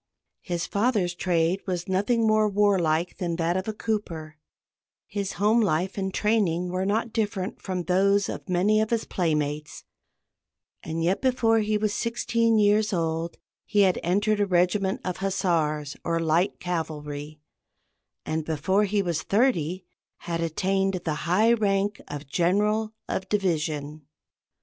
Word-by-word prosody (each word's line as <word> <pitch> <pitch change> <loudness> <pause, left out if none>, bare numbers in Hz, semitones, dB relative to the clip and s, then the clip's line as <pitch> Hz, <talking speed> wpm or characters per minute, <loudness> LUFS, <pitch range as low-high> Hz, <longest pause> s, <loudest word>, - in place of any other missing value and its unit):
His 175 -3 -3
father's 200 -4 +1
trade 175 +1 0
was 175 -2 -2
nothing 205 +5 +1
more 215 -1 +3
warlike 185 -5 +1
than 175 -2 -1
that 170 +1 0
of 185 +2 -2
a - - 0
cooper; 170 -9 -4 0.7
his 200 -2 -4
home 215 +5 +3
life 185 -1 0
and 190 -1 -2
training 185 -5 +1
were 185 +1 -1
not 220 +2 0
different 205 -3 -2
from 185 -2 -3
those 195 +3 +2
of - - -7
many 200 +4 +3
of 220 - -1
his 230 -1 0
playmates; 150 -3 -2 1.0
and 160 +1 -3
yet 180 +3 +1
before 235 -4 +3
he 215 0 +1
was 210 -1 0
sixteen 230 -1 +1
years 210 0 +3
old 165 -1 -2 0.3
he 205 -1 +2
had 190 -2 +3
entered 205 +4 +1
a 205 - +2
regiment 190 +5 +1
of 180 -1 -2
hussars, 160 -7 0
or 165 0 0
light 165 +4 +1
cavalry, 150 -3 -4 0.9
and 160 0 -2
before 165 +7 +1
he 200 0 0
was 170 -3 -1
thirty 185 - +1 0.4
had 170 -1 -3
attained 190 +4 0
the 160 - 0 0.2
high 215 +6 +4
rank 205 -2 0
of 145 0 -6
general 210 +8 +1 0.2
of 190 - -3
division. 155 -6 -1
190 Hz, 145 wpm, -26 LUFS, 165-210 Hz, 1.0 s, high